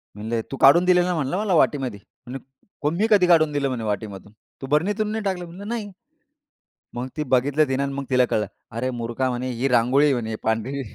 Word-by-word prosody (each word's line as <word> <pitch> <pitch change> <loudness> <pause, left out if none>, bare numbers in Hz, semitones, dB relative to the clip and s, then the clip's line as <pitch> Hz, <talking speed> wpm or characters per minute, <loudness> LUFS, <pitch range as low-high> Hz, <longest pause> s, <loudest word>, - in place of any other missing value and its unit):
म्हणले, 110 +2 -3
"तू 135 - -4
काढून 170 +7 +6
दिलेला 180 0 +3
म्हणलं 155 +4 -1
मला 205 -3 0
वाटीमध्ये." 130 -9 +1 0.3
म्हंटली, 135 +4 -6
"मी 220 +3 +2
कधी 190 -4 +5
काढून 155 -3 +4
दिलं 145 -1 0
म्हणे 120 -3 -4
वाटीमधून 105 -1 -5 0.3
तू 135 - -6
बरणीतून 205 +9 0
नाही 220 -1 -3
टाकलं?" 185 -3 -2
म्हणलं, 180 +4 -10
"नाही." 220 -3 -4 1.0
मग 125 +2 -4
ती 150 - 0
बघितलं 135 +1 +2
आणि 140 0 -3
मग 140 0 -4
तिला 125 -1 +3
कळलं. 105 -3 -1 0.3
"अरे 120 +3 -2
मूर्खा 120 +3 -2
म्हणे 125 +1 -3
ही 125 +3 -1
रांगोळी 125 +4 +3
आहे 145 - +3
म्हणे 110 -3 -3
पांढरी." 115 +5 -1
135 Hz, 190 wpm, -23 LUFS, 120-175 Hz, 1.0 s, काढून